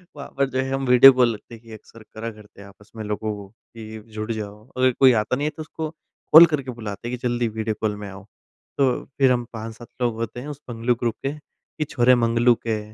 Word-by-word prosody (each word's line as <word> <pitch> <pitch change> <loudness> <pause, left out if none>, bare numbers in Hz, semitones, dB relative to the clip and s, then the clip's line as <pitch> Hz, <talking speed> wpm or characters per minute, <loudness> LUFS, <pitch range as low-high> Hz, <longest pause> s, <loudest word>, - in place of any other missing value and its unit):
वहाँ 140 - -8
पर 140 -1 +1
जो 130 - -2
है 130 0 -1
हम 135 0 -1
वीडियो 125 +2 +9
कॉल 125 -2 +3
रखते 110 +2 -11
हैं 115 - -17
कि 115 - -15
अक़्सर 110 +1 -14
करा 115 +1 -5
करते 105 -2 -16
हैं 100 - -12
आपस 105 +1 -19
में 110 - -6
लोगों 105 +1 -3
को, 100 -1 -10 0.3
कि 110 -1 -9
अब 110 - -13
जुड़ 110 +2 -3
जाओ। 105 +1 -7
अगर 130 0 +4
कोई 130 -1 +7
आता 110 +4 -2
नहीं 145 +3 -1
है - - -2
तो 155 - -6
उसको 155 0 -5 0.4
कॉल 165 +2 +12
करके 135 -4 -2
बुलाते 105 +1 -6
हैं 125 - -3
कि 125 - -3
जल्दी 120 0 0
वीडियो 110 0 -3
कॉल 105 -1 0
में - - -6
आओ। 95 0 -11 0.5
तो 135 -2 +3 0.3
फिर 135 -2 +5
हम 120 -1 0
5-7 115 +1 -8
लोग 120 -2 +1
होते 115 +1 -5
हैं 130 - -8
उस 145 -1 -8
मंगलू 120 +1 0
ग्रुप 120 -1 -2
के, 135 - -1
कि 150 0 -9
छोरे 125 -3 +3
मंगलू 120 0 +3
के, 110 -2 -3
115 Hz, 250 wpm, -23 LUFS, 110-130 Hz, 0.5 s, कॉल